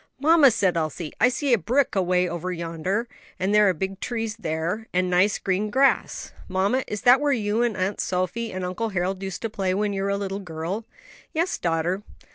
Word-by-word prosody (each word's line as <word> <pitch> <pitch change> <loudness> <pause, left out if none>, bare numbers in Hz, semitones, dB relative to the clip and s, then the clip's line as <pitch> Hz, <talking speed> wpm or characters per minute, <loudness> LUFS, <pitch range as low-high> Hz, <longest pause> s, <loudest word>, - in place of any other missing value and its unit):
"Mamma!" 310 0 +6
said 190 -6 +1
Elsie. 155 0 -3
"I 250 - +6
see 270 +1 0
a 235 - +4
brook 255 - +1
away 180 -1 +2
over 175 +1 -4
yonder; 175 +6 -2 0.3
and 190 +2 0
there 210 -1 +6
are - - +2
big 190 +3 -4
trees 225 -2 -3
there, 175 +4 -3
and 180 0 +1
nice 185 +3 +3
green 195 +2 -1
grass. 270 +5 +1
Mamma, 200 +8 +1
is 210 - -4
that 250 +3 +6
where 290 -1 +2
you 220 -3 0
and 235 -4 0
Aunt 190 +2 -1
Sophie 185 +6 -2
and 185 0 -4
Uncle 205 +5 -2
Harold 190 0 -2
used 190 0 -5
to 225 - -1
play 190 -3 -1
when 205 0 0
you 195 - -2
were 195 - -1
a 200 - 0
little 195 0 -3
girl?" 180 +4 -5 0.5
"Yes, 340 +3 0
daughter." 170 +3 0
195 Hz, 205 wpm, -24 LUFS, 180-225 Hz, 0.5 s, Mamma